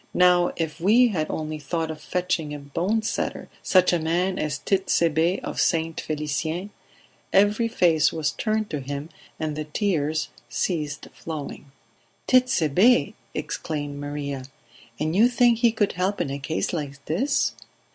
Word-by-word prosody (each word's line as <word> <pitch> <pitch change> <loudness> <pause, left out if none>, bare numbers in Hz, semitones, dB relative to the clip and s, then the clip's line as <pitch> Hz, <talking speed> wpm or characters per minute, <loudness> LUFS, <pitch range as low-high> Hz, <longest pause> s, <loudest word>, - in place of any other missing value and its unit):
Now 180 -1 +5
if 160 -1 -3
we 235 +7 +5
had 160 -7 -1
only 155 0 -3
thought 160 +2 -2
of 155 -1 -9
fetching 165 -3 -2
a - - -6
bone 175 +10 -1
setter - - -3
such 185 -1 +4
a 175 - +2
man 180 +4 0
as 150 -2 -1
Tit'Sebe 170 -2 +1
of - - -2
St. 165 -1 +1
Felicien 155 +5 -3 0.3
..." - - -28 0.2
Every 205 +4 +4
face 175 -9 +3
was 155 -2 -1
turned 215 +2 -1
to 150 - -2
him 140 +3 -5 0.3
and 155 -1 -2
the 155 0 -4
tears 155 -3 0 0.2
ceased 150 -5 -2
flowing. 145 -3 -7 0.6
"Tit'Sebe!" 245 - +4 0.2
exclaimed 145 -3 -4
Maria. 145 -2 -4 0.5
"And 155 +2 -1
you 220 +5 +6
think 245 -2 +3
he 235 -1 +4
could 210 -2 +1
help 185 +3 -1
in 135 - -1
a 140 - -3
case 160 +6 -2
like 140 -3 -5
this?" 270 - +1
165 Hz, 150 wpm, -24 LUFS, 150-195 Hz, 0.6 s, you